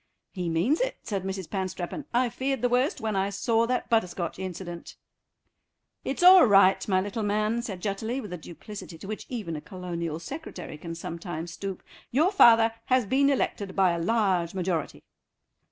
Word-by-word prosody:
"He 180 -3 -3
means 180 - +1
it," - - -1
said 195 -3 -3
Mrs. 190 -2 -4
Panstreppon; 185 - -4
"I 245 +1 +2
feared 265 +1 -2
the 245 - +3
worst 250 +4 +1
when 220 -2 -2
I 195 +1 +1
saw 225 +3 +1
that 250 +1 -1
butterscotch 180 -7 -1
incident." 180 -2 -7 1.1
"It's 275 +6 -2
all 365 -5 +9
right, 195 -2 +5
my 190 -2 +3
little 205 +4 -3
man," 215 +2 0
said 195 -7 -6
Jutterly, 220 +5 -2
with 210 -7 -7
the 180 - -4
duplicity 175 +2 -10
to 195 - -10
which 215 +1 -6
even 210 -10 -4
a 150 - -5
Colonial 170 -3 -5
Secretary 220 - -8
can 165 +1 -6
sometimes 170 0 -6
stoop, 195 0 -6 0.3
"your 315 +9 +3
father 230 - +6
has 255 -2 +2
been 275 +6 +3
elected 205 -7 -1
by 190 -2 +4
a 170 - -2
large 190 -3 +1
majority." 180 -4 -2
195 Hz, 170 wpm, -27 LUFS, 175-235 Hz, 1.1 s, all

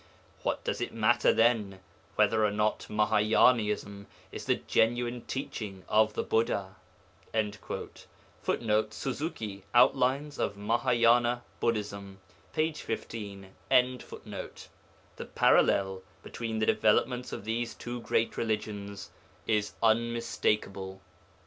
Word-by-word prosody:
What - - -2
does - - -2
it - - -3
matter, 115 +1 +4
then, 110 -5 +2 0.4
whether 110 -1 +3
or 105 - +4
not 105 +1 0
Mahâyânaism 105 -1 +2 0.2
is - - -7
the - - +3
genuine 120 +1 0
teaching 105 -8 -5
of 110 0 +3
the - - -1
Buddha?' 100 -4 0 1.7
[Footnote: 110 -1 0
Suzuki, 115 - -4
Outlines 130 +3 +3
of 100 - -1
Mahâyâna 120 +2 +2 0.2
Buddhism, 100 -4 -2 0.3
p. 160 0 0
15.] 105 -7 -6 1.7
The - - -6
parallel 95 -1 +3 0.2
between 115 -1 -4
the 110 - +1
developments 125 +4 +2
of - - -6
these 115 +1 -2
two 120 0 -6
great 115 0 0
religions 100 -3 -3 0.3
is 105 -2 0
unmistakable. 110 -4 0
110 Hz, 100 wpm, -29 LUFS, 105-120 Hz, 1.7 s, matter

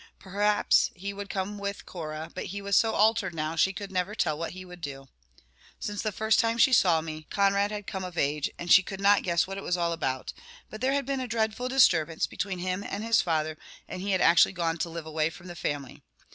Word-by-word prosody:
Perhaps 205 +2 +2
he 200 +2 -5
would 200 0 -7
come 200 +1 -3
with 200 0 -5
Cora, 155 -2 -6
but - - -5
he 200 +2 -5
was 200 -1 -1
so 225 +3 +3
altered 215 -4 +2
now, 155 +1 -2
she 190 +4 +3
could 195 +1 -7
never 185 +3 -1
tell 155 - 0
what 165 +3 -5
he 185 0 -9
would 180 -1 -12
do. 135 -3 -7 0.7
Since 205 -1 -4
the 215 - -1
time 220 +2 +2
she 250 - +5
first 250 - +7
saw 165 -4 +3
me, 155 -1 -7
Conrad 200 0 +2
had 210 -1 -5
come 190 -1 -5
of 180 -1 -7
age, 145 +1 0
and 175 0 -4
she 190 - +9
could 190 +1 -7
not 200 +1 +5
guess 170 -1 +1
what 195 +1 -6
it - - -8
was 180 - 0
all 170 -1 0
about, 130 -5 -3 0.4
but 215 - -8
there 265 +1 +2
had 280 -1 0
been 275 0 -2
a 255 - -3
dreadful 225 +2 -1
disturbance 170 - +3
between 195 -2 -4
him 185 +2 -3
and 205 +1 -5
his 230 -1 +3
father, 155 -2 -1 0.3
and 185 - -6
he 200 - -3
had 185 -2 +2
actually 170 +3 +5
gone 170 -2 -1
to 170 - -2
live 165 -1 -7
away 155 0 0
from 175 +2 -13
the 175 -1 -8
family. 145 -5 -4
185 Hz, 240 wpm, -28 LUFS, 165-205 Hz, 0.7 s, she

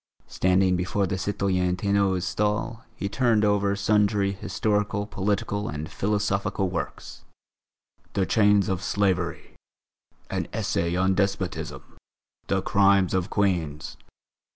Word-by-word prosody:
Standing 95 0 +2
before 90 +3 0
the 95 - -2
citoyenne 95 -2 0
Ténot's 100 -2 +1
stall, 105 +5 -1
he 100 - -3
turned 115 -1 +2
over 100 -1 +2
sundry 100 -1 +2
historical, 105 +1 -1
political, 100 +1 -2
and 75 +1 -5
philosophical 100 -2 -1
works: 90 - -6 0.9
"The 95 - +1
Chains 105 -2 +3
of 95 -1 -1
Slavery," 100 -3 -1 0.7
"An - - -3
Essay 85 +1 -1
on 95 +1 +2
Despotism," 95 -1 -2 0.6
"The - - 0
Crimes 100 -2 +3
of 95 -1 0
Queens." 85 -6 -1
100 Hz, 110 wpm, -25 LUFS, 95-105 Hz, 0.9 s, Chains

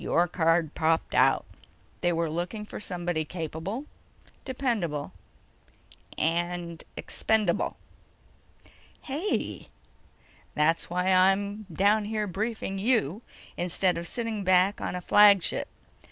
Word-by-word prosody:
Your 175 +1 +2
card 165 -2 +1
popped 160 0 +1
out. - - +4 0.6
They 175 - +2
were 165 0 0
looking 175 +7 -4
for - - -8
somebody 175 -5 -2
capable, 165 - -5 0.6
dependable... 225 - -2 1.1
and... 170 0 -1
expendable!" 220 -1 0 1.3
"Hey!" 310 +9 -3 0.9
"That's 160 +2 +1
why 180 +2 +1
I'm 200 +3 +2
down 205 +5 +3
here 215 0 -1
briefing 205 0 -3
you 215 - +1 0.4
instead 180 +1 +1
of 170 - -6
sitting 230 -2 -3
back 185 +2 +3
on - - -3
a 180 - -4
flagship. 205 -1 +5
185 Hz, 105 wpm, -27 LUFS, 170-210 Hz, 1.3 s, flagship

